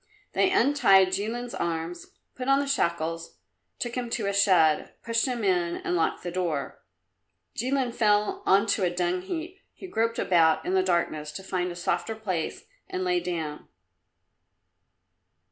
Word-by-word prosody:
They - - +3
untied 270 - +5
Jilin's 225 +6 -3
arms, 170 +1 -3 0.3
put 255 0 -6
on 275 0 +5
the 285 - 0
shackles, 165 - -1 0.4
took 240 - -4
him 245 -1 -3
to 230 -2 -2
a 200 - 0
shed, 185 -6 +3
pushed 230 +2 +1
him 245 -3 -2
in 175 -3 +1
and 180 - -2
locked 165 - 0
the 175 - -4
door. 170 -6 -3 0.7
Jilin 255 0 0
fell 210 -3 +2
on 195 +3 +5
to 200 - -1
a 180 - +3
dung 175 +1 -1
heap. 345 - -6 0.2
He - - -10
groped 230 -9 -1
about 165 -3 +3
in 185 - -1
the 190 - +4
darkness 170 -4 -1
to 190 - -7
find 180 -1 -2
a - - -7
softer 175 +4 -2
place 185 -7 -3 0.3
and 370 0 -3
lay 360 -1 +1
down. 160 - -4
190 Hz, 160 wpm, -27 LUFS, 175-240 Hz, 0.7 s, untied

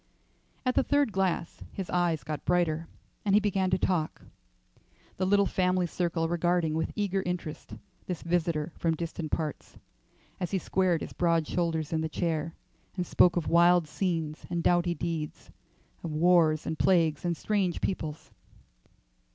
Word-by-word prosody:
At 255 - +2
the - - +3
third 285 -3 +2
glass 185 -3 -1
his 190 -2 -4
eyes 170 -5 +1
got 150 +3 -5
brighter, 165 -2 +1 0.4
and 200 -1 +3
he - - +7
began 195 -3 0
to 185 - +2
talk, 175 -4 -1 0.9
the 185 - 0
little 200 +1 +4
family 185 -1 +1
circle 170 -1 -1
regarding 175 -1 +1
with 160 +1 -1
eager 195 -2 0
interest 180 -4 -5 0.3
this 180 -4 -4
visitor 165 -2 0
from 165 -1 +1
distant 165 -1 -5
parts, 155 -3 -4 0.6
as 180 -3 -2
he 195 - 0
squared 185 -2 +1
his - - -6
broad 165 -3 +1
shoulders 165 -3 -1
in 160 - +1
the 160 - -2
chair 165 -1 -2 0.4
and 180 - -1
spoke 175 - +4
of 165 - -1
wild 170 0 +5
scenes 165 -3 -2
and 170 -1 -2
doughty 175 0 +2
deeds; 165 -3 -4 0.5
of 165 - -4
wars 160 -1 +3
and 160 - -3
plagues 165 -5 +3
and 170 -2 -1
strange 195 -5 0
peoples. 155 -5 -4
170 Hz, 155 wpm, -29 LUFS, 160-180 Hz, 0.9 s, he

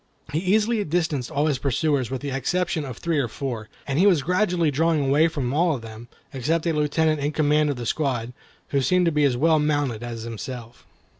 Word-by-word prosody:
He 155 - +1
easily 210 +4 +2
distanced 160 -7 -1
all 145 +2 0
his 145 -5 0
pursuers 140 -1 0
with 130 -1 -4
the 140 -1 -4
exception 160 +4 -1
of 125 -3 -7
three 165 -3 -1
or 135 - 0
four, 115 -3 -5 0.2
and 140 +2 -1
he 195 - +5
was 170 -8 +4
gradually 180 -1 +1
drawing 155 0 +1
away 145 +4 +4
from 140 -6 -3
all 165 +1 +2
of 120 - -8
them, 115 +1 -10 0.3
except 155 +6 -1
a 165 - +1
lieutenant 155 +1 +1
in 145 +1 -1
command 150 0 +2
of 145 - -1
the 120 -1 -6
squad, 125 -3 -1 0.4
who 140 - +1
seemed 180 +6 +2
to 170 - +3
be 150 -1 +2
as 130 -3 +1
well 160 +3 +3
mounted 145 -6 0
as 120 -2 -6
himself. 115 +1 -8
145 Hz, 215 wpm, -24 LUFS, 130-165 Hz, 0.4 s, he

